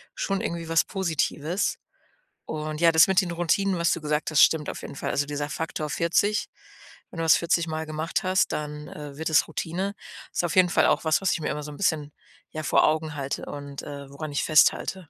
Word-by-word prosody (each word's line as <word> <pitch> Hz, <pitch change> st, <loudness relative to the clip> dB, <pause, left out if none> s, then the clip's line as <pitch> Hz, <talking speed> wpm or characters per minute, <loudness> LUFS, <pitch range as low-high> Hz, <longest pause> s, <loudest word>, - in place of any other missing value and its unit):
schon 195 Hz, -1 st, -1 dB
irgendwie 170 Hz, -6 st, -4 dB
was 165 Hz, 0 st, +3 dB
Positives. 170 Hz, -1 st, -1 dB, 0.7 s
Und 155 Hz, 0 st, -4 dB
ja, 170 Hz, -1 st, +6 dB
das 160 Hz, 0 st, +7 dB
mit 190 Hz, -1 st, +4 dB
den 180 Hz, -2 st, -4 dB
Routinen, 175 Hz, +3 st, +1 dB
was 170 Hz, 0 st, +2 dB
du -, -, 0 dB
gesagt 150 Hz, +1 st, -1 dB
hast, 150 Hz, -, +5 dB
stimmt 155 Hz, -2 st, +4 dB
auf -, -, -6 dB
jeden -, -, -8 dB
Fall. -, -, -3 dB
Also 145 Hz, -, 0 dB
dieser 145 Hz, 0 st, -4 dB
Faktor 155 Hz, 0 st, -4 dB
40, 200 Hz, +7 st, +1 dB, 0.6 s
wenn -, -, -12 dB
du 165 Hz, -, -1 dB
das 160 Hz, -, +6 dB
vierzigmal 165 Hz, -2 st, -1 dB
gemacht 155 Hz, +3 st, -2 dB
hast, 185 Hz, 0 st, +1 dB
dann, 150 Hz, 0 st, -5 dB
äh, 145 Hz, -2 st, -9 dB
wird 160 Hz, +1 st, -2 dB
es 155 Hz, -, +4 dB
Routine, 180 Hz, +5 st, -3 dB, 0.4 s
ist -, -, 0 dB
auf 165 Hz, -, -2 dB
jeden 185 Hz, -1 st, +5 dB
Fall -, -, +3 dB
auch -, -, +2 dB
was, 160 Hz, -1 st, +2 dB
was 195 Hz, -, +1 dB
ich 165 Hz, -, -3 dB
mir -, -, -2 dB
immer 150 Hz, -, -4 dB
so 150 Hz, -, -7 dB
'n 145 Hz, -, -10 dB
bisschen, 155 Hz, -6 st, 0 dB, 0.4 s
ja, 155 Hz, -, -5 dB
vor -, -, +4 dB
Augen 155 Hz, 0 st, 0 dB
halte 140 Hz, -1 st, -4 dB
und, 140 Hz, -1 st, -7 dB
äh, 140 Hz, -1 st, -8 dB
woran 145 Hz, +2 st, -7 dB
ich 145 Hz, -, -1 dB
festhalte. 160 Hz, +2 st, +3 dB
160 Hz, 220 wpm, -25 LUFS, 150-170 Hz, 0.7 s, das